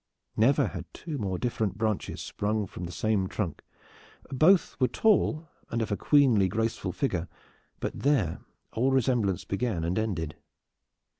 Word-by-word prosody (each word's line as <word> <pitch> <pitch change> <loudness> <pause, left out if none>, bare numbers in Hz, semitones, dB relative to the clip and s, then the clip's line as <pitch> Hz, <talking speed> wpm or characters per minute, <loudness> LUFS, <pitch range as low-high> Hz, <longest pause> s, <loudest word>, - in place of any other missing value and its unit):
Never 125 +6 +3
had - - -8
two 155 -5 -5
more 95 -3 -2
different 110 -5 -1
branches 110 -2 -2
sprung 105 0 -1
from 90 -1 -7
the 85 - -6
same 105 -1 0
trunk. 90 -8 -3 0.7
Both 160 +6 +4
were 130 - +4
tall 170 - +2 0.2
and 115 - -1
of 110 -2 -2
a - - +2
queenly 125 -7 +4
graceful 110 -1 -1
figure. 90 - -1 0.5
But - - -4
there 130 - +1 0.3
all 125 +4 +2
resemblance 120 -8 +1
began 100 -4 -1
and 85 +5 0
ended. 85 -8 -2
110 Hz, 145 wpm, -28 LUFS, 95-130 Hz, 0.7 s, Both